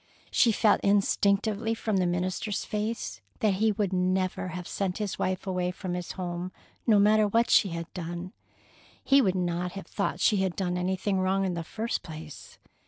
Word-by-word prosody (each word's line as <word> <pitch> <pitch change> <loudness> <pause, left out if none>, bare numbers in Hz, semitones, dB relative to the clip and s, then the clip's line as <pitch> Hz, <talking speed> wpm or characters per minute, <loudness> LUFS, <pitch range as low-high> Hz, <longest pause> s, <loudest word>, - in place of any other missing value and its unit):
She 235 - +4
felt 210 -1 +3
instinctively, 205 +2 +2
from 220 -3 -1
the 180 -1 +2
minister's 185 +4 -2
face, 210 - -3 0.2
that 210 -2 +3
he 220 0 +4
would 200 -2 -1
not 185 0 +1
have 180 -1 -6
sent 190 -2 -2
his 210 -3 -3
wife 185 0 -1
away 180 -2 -1
from 180 0 -5
his 180 -1 -4
home, 180 0 -4 0.4
no 220 -3 +6
matter 210 +1 +5
what 230 +3 +2
she 200 - +5
had 170 0 -4
done. 175 +1 -5 0.7
He 275 0 +5
would 190 -6 +1
not 175 0 -1
have 195 - -7
thought 200 - -2
she 210 - +3
had 190 -2 0
done 180 -2 -1
anything 190 +2 0
wrong 190 +1 +1
in 185 - -1
the 170 -1 -3
first 225 +7 -3
place. 155 -2 -10
190 Hz, 180 wpm, -28 LUFS, 180-210 Hz, 0.7 s, no